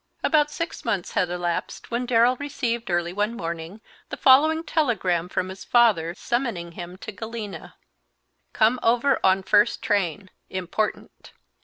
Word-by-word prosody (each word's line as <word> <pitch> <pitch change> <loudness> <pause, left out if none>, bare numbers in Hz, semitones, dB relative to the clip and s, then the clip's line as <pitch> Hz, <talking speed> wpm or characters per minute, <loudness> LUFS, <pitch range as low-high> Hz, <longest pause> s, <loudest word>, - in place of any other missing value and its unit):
About 300 -2 +3
six 335 +2 -5
months 205 -6 -2
had 180 - 0
elapsed 175 +4 -3
when 240 +1 -1
Darrell 240 +1 +4
received, 240 -5 -3
early 175 0 0
one 210 +4 -1
morning, 170 +4 -6 0.3
the - - -5
following 310 +5 +5
telegram 195 - 0
from 185 0 -2
his 190 +1 -9
father, 205 -9 +3
summoning 230 -10 -2
him 175 +1 -8
to 215 - -8
Galena: 220 0 -7 0.8
"Come 230 +3 +2
over 245 +4 +2
on 190 0 +3
first 210 +4 +3
train. 200 -4 -1 0.2
Important." 190 +3 -4
215 Hz, 140 wpm, -24 LUFS, 180-240 Hz, 0.8 s, following